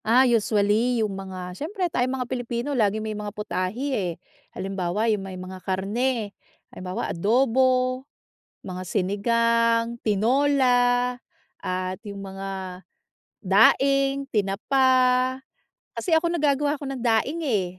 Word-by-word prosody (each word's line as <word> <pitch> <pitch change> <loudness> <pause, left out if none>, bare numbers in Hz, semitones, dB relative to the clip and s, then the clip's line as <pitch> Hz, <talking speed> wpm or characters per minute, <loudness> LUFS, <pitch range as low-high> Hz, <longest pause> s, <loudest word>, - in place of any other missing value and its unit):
Ah, 245 +4 +5
usually 225 0 +2
yung 205 - -4
mga, 185 -2 -7
siyempre 360 - -3
tayong 255 -5 -1
mga 250 - -2
Pilipino 245 +2 -3
laging 215 -3 +1
may 215 - -3
mga 210 0 -5
putahe, 210 +6 -2
eh. 185 -8 -1 0.4
Halimbawa, 190 +2 -2
yung 205 - -2
may 190 -1 -7
mga 185 0 -8
karne, 205 +4 -1 0.4
halimbawa 185 0 -4
adobo, 255 +5 +2 0.6
mga 185 -1 -5
sinigang, 230 +4 +1
tinola, 245 +2 +2 0.4
at 185 0 -3
yung 200 -1 -7
mga 190 -1 -6 0.6
daing, 275 +7 +4
tinapa. 215 +6 +2 1.1
Kasi, 345 - -1
ako 340 +1 0
nagagawa 290 -2 +1
ako 280 - -4
ng 265 -3 -5
daing, 240 +8 +1
eh, 210 -9 +1
230 Hz, 120 wpm, -24 LUFS, 195-260 Hz, 1.1 s, Ah